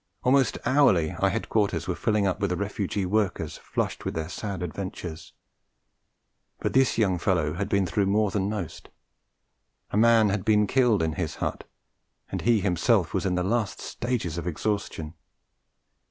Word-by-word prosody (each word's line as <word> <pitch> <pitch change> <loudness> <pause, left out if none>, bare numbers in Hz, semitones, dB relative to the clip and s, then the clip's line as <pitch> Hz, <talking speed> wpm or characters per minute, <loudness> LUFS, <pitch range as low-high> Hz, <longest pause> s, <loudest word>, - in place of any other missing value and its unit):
Almost 135 +1 +3
hourly 115 - +4
our - - +3
headquarters 100 -6 0
were 90 - 0
filling 105 +2 +1
up 95 - 0
with 100 -2 0
refugee 100 0 -2
workers 105 +1 -1
flushed - - -3
with - - -3
their 80 0 -3
sad 95 -1 -4
adventures; 85 -2 -6 1.3
but - - -2
this 130 -1 +3
young 95 -6 +2
fellow 85 -5 +1
had 100 +5 -3
been 100 -2 +2
through 95 +3 0
more 105 +1 +2
than 100 0 0
most; 100 -7 -5 1.0
a - - 0
man 115 -1 +5
had 100 -1 -1
been 105 -1 +4
killed 120 -5 +3
in 80 -1 0
his 80 -2 -3
hut, - - -3 0.7
and - - -3
he 115 -3 +3
himself 90 -4 +2
was - - 0
in 90 - 0
the 90 - 0
last 110 +1 -1
stages 110 -10 -3
of 85 - -6
exhaustion. 85 -3 -3
100 Hz, 160 wpm, -26 LUFS, 90-110 Hz, 1.3 s, man